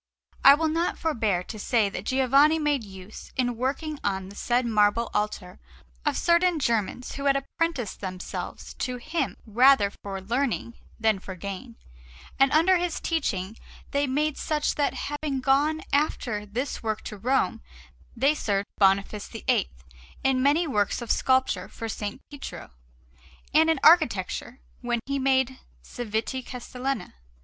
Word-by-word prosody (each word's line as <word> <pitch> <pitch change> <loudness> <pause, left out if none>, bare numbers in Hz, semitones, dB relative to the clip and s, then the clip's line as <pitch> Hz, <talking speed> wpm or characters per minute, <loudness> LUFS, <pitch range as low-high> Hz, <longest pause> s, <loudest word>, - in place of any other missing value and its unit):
I 275 - +10
will 320 +2 0
not 330 +3 0
forbear 220 - 0
to 215 +3 -8
say 220 0 +2
that 195 0 -6
Giovanni 275 +5 +4
made 295 -5 0
use, 190 0 -11
in 245 -2 +1
working 280 +5 -2
on 190 -1 -2
the 200 - -12
said 245 +3 +1
marble 215 +1 +2
altar, 210 -3 -2 0.5
of - - +1
certain 340 0 +3
Germans 235 -2 -1
who 275 - -5
had 275 -1 +4
apprenticed 275 - -2
themselves 185 -2 -6
to 250 -1 -2
him 310 +2 -2
rather 240 -1 +5
for 195 -1 -5
learning 235 +3 -1 0.3
than 220 -3 +2
for 190 0 -8
gain; 200 +6 -7 0.6
and 270 0 +5
under 345 +4 +5
his 350 -2 -2
teaching 215 - -2 0.4
they 285 0 +1
became 295 +3 +1
such 300 +1 -1
that, 290 - 0
having 290 -2 -3
gone 285 +4 +2
after 240 -7 0
this 250 +7 -3
work 220 -1 -2
to 210 - -7
Rome, 250 - +1 0.6
they 275 +5 +4
served 200 -8 -1
Boniface 200 +1 +2
VIII 230 -1 0 0.5
in 265 -1 +2
many 290 +6 +3
works 210 -4 0
of 235 - -2
sculpture 260 0 +1
for 230 - -7
S. 225 - -5 0.3
Pietro, 285 - -8 0.8
and 320 +2 +5
in 320 - +2
architecture 250 - +3 0.2
when 240 -1 -1
he 275 0 -1
made 265 -1 +1 0.2
Cività 240 +2 -3
Castellana. 250 +1 -4
255 Hz, 145 wpm, -26 LUFS, 210-285 Hz, 0.8 s, I